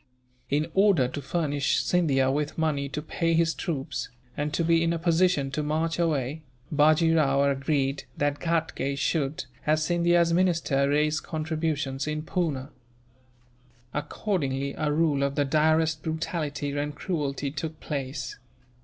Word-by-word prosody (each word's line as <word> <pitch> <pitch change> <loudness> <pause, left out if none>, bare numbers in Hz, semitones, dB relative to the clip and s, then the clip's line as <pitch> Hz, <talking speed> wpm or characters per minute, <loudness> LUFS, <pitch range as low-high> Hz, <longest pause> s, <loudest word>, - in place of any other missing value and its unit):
In 150 +2 +1
order 195 -10 +4
to 145 - -5
furnish 145 -1 0
Scindia 135 -7 +2
with 145 +1 -2
money 150 -3 0
to 150 +2 -4
pay 165 +1 0
his 165 0 +3
troops, 145 -5 -3 0.3
and 150 +1 -2
to 170 - 0
be 165 0 +3
in 165 0 +1
a - - -1
position 165 -4 +2
to 150 - -1
march 160 +3 -1
away, 155 -3 0 0.3
Bajee 155 +2 +4
Rao 140 -3 +3
agreed 140 0 0
that 145 0 0
Ghatgay 165 -5 -1
should, 140 -1 -1 0.2
as 155 +1 +3
Scindia's 170 0 +3
minister, 165 -6 +2
raise 150 +1 +2
contributions 155 -4 -2
in 155 0 -2
Poona. 150 -5 -2 1.2
Accordingly, 140 -3 -2
a 150 -1 0
rule 150 -2 +2
of 140 0 0
the 145 -1 +2
direst 155 +2 +2
brutality 155 -3 -3
and 145 0 -2
cruelty 145 -3 -2
took 155 +2 -5
place. 135 -2 -4
150 Hz, 140 wpm, -27 LUFS, 140-165 Hz, 1.2 s, order